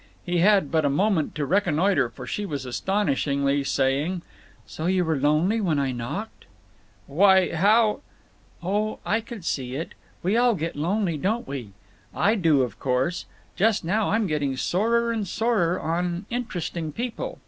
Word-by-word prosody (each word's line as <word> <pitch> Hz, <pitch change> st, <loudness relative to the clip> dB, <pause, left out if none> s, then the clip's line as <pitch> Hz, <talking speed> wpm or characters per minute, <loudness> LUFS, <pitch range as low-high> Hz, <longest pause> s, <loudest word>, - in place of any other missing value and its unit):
He 175 Hz, -1 st, 0 dB
had 195 Hz, -5 st, +4 dB
but 160 Hz, -1 st, +2 dB
a 145 Hz, -, +2 dB
moment 180 Hz, +2 st, +1 dB
to 150 Hz, -2 st, -1 dB
reconnoiter, 175 Hz, -, +2 dB
for 115 Hz, -, -10 dB
she 210 Hz, -, -3 dB
was 145 Hz, -9 st, -4 dB
astonishingly 140 Hz, -3 st, 0 dB
saying: 140 Hz, +7 st, 0 dB, 0.4 s
"So 160 Hz, -, -5 dB
you 185 Hz, -1 st, +2 dB
were 160 Hz, -1 st, +1 dB
lonely 155 Hz, +10 st, +2 dB
when 165 Hz, -7 st, +1 dB
I 135 Hz, -2 st, 0 dB
knocked?" 120 Hz, -1 st, -6 dB, 0.6 s
"Why, 190 Hz, +5 st, +4 dB
how—" 210 Hz, +7 st, +3 dB, 0.6 s
"Oh, 210 Hz, +4 st, -1 dB
I 225 Hz, +2 st, +1 dB
could 225 Hz, -5 st, -9 dB
see 130 Hz, -4 st, -2 dB
it. 160 Hz, +4 st, -5 dB, 0.3 s
We 190 Hz, +5 st, +1 dB
all 240 Hz, -1 st, +4 dB
get 165 Hz, -1 st, -4 dB
lonely, 175 Hz, +2 st, 0 dB
don't 215 Hz, +10 st, -1 dB
we? 125 Hz, -8 st, -6 dB, 0.4 s
I 210 Hz, -, +3 dB
do, 165 Hz, -, +3 dB
of 125 Hz, -, -5 dB
course. 130 Hz, +7 st, -1 dB, 0.3 s
Just 210 Hz, -2 st, +2 dB
now 210 Hz, +5 st, +1 dB
I'm 220 Hz, +1 st, +1 dB
getting 145 Hz, -6 st, -1 dB
sorer 230 Hz, -, +1 dB
and 220 Hz, -3 st, -2 dB
sorer 205 Hz, -5 st, +1 dB
on 175 Hz, +3 st, -2 dB
Interesting 175 Hz, -9 st, -3 dB
People. 240 Hz, +6 st, -4 dB
175 Hz, 160 wpm, -25 LUFS, 145-210 Hz, 0.6 s, had